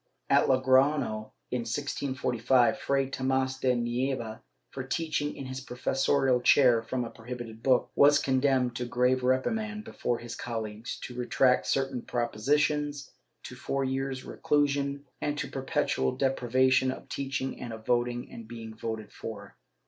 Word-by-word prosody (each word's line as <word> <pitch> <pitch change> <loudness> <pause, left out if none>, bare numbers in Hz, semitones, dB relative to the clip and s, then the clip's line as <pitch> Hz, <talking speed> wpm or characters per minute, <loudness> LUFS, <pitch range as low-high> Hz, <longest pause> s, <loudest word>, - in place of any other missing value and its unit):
^ - - +6
At - - +4
Logroiio, 130 -4 +2 0.2
in 125 - 0
1645, 125 -1 +1
Fray 135 -1 +1
Tomas 130 0 -1
de 125 -1 +2
Nieva, 120 -1 -2 0.3
for 135 - -5
teaching 150 +1 -2
in 135 - -7
his 130 0 -5
professorial 135 0 +1
chair 125 -3 +5
from 120 +2 -3
a 115 - -7
prohibited 115 -1 -8
book, 130 -1 +2
was 145 +1 +6
condemned 130 -2 +2
to 125 - -2
grave 125 +1 +2
reprimand 210 - 0
before 120 - -2
his 120 0 -8
colleagues, 110 -1 -5
to 125 - -7
retract 125 -2 +2
certain 135 -1 0
propositions, 145 +5 0 0.3
to - - -8
four 135 +2 -2
years' 130 0 -2
reclusion, 140 -1 0 0.2
and 145 0 -1
to - - -2
perpetual 130 - -1
deprivation 130 0 +2
of 130 - -6
teaching 135 -1 -3
and 120 - -5
of 110 -1 -9
voting 120 0 0
and 115 -1 -9
being 115 -1 -8
voted 110 -1 -5
for. 100 -3 -8
130 Hz, 145 wpm, -29 LUFS, 120-135 Hz, 0.3 s, ^